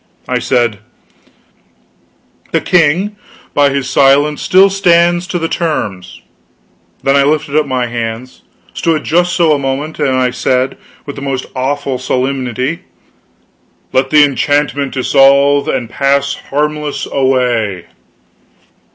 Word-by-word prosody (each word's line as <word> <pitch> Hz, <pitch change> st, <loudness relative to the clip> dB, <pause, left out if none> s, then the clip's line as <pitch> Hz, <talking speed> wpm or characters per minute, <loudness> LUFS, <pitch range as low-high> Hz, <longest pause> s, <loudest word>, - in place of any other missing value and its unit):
I -, -, -1 dB
said: 120 Hz, -5 st, 0 dB, 1.7 s
"The -, -, +1 dB
king, 180 Hz, +5 st, +1 dB, 0.4 s
by 145 Hz, -1 st, +3 dB
his 140 Hz, -2 st, -2 dB
silence, 140 Hz, +3 st, +3 dB
still 190 Hz, +1 st, +4 dB
stands 175 Hz, -2 st, +2 dB
to 180 Hz, -, -2 dB
the 165 Hz, -1 st, -2 dB
terms." 100 Hz, -, -4 dB, 0.8 s
Then 135 Hz, +1 st, +2 dB
I 140 Hz, -, +4 dB
lifted 145 Hz, 0 st, 0 dB
up 155 Hz, -1 st, +2 dB
my 130 Hz, -2 st, -1 dB
hands 120 Hz, +1 st, -5 dB, 0.3 s
stood 160 Hz, -2 st, -1 dB
just 175 Hz, +2 st, +1 dB
so 165 Hz, -3 st, +3 dB
a 145 Hz, -, 0 dB
moment 140 Hz, +3 st, -3 dB
then 140 Hz, -4 st, 0 dB
I 130 Hz, -1 st, +1 dB
said, 125 Hz, +1 st, -1 dB, 0.3 s
with 145 Hz, -, -8 dB
the -, -, -7 dB
most 135 Hz, -2 st, -3 dB
awful 135 Hz, 0 st, -2 dB
solemnity: 130 Hz, +2 st, -2 dB, 1.1 s
"Let 130 Hz, +1 st, +1 dB
the 150 Hz, 0 st, +6 dB
enchantment 145 Hz, -1 st, -1 dB
dissolve 140 Hz, +2 st, +3 dB
and 125 Hz, -3 st, -2 dB
pass 140 Hz, +3 st, 0 dB, 0.2 s
harmless 150 Hz, +1 st, -2 dB
away!" 125 Hz, -9 st, 0 dB
140 Hz, 125 wpm, -13 LUFS, 130-150 Hz, 1.7 s, the